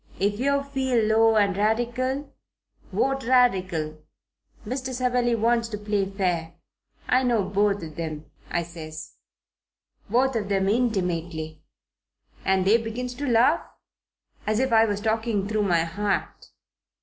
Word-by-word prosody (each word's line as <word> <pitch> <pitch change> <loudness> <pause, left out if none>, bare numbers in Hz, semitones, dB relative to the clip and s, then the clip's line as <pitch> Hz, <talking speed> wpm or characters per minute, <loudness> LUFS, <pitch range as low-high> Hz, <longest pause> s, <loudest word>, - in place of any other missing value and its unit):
If 205 +2 0
yer 280 +2 +1
feel 265 -5 0
low 225 +1 +4
and 200 -3 +3
Radical, 240 +6 -1 0.6
vote 270 0 0
Radical. 185 -11 +2 0.6
Mr. 260 0 -4
Savelli 245 -1 +1
wants 230 +1 +1
to 210 - -4
play 205 -1 -1
fair. 175 -4 -2 0.5
I 255 +1 +3
know 240 -5 +2
both 200 0 +1
of 155 0 -8
'em,' 155 -2 -4 0.2
I 170 - 0
says, 160 -2 -9 0.9
'both 255 +4 +2
of 205 -3 -2
'em 195 0 +2
intimately.' 175 -9 -1 0.8
And 190 -1 +2
they 210 +4 +6
begins 235 +2 -4
to 285 +3 -4
laugh, 245 +7 +4 0.9
as 215 0 +1
if 260 -2 +1
I 225 0 +6
was 205 -2 -2
talking 220 -2 0
through 215 -1 0
my 170 -3 +3
hat. 200 +5 -3
215 Hz, 135 wpm, -25 LUFS, 190-245 Hz, 0.9 s, they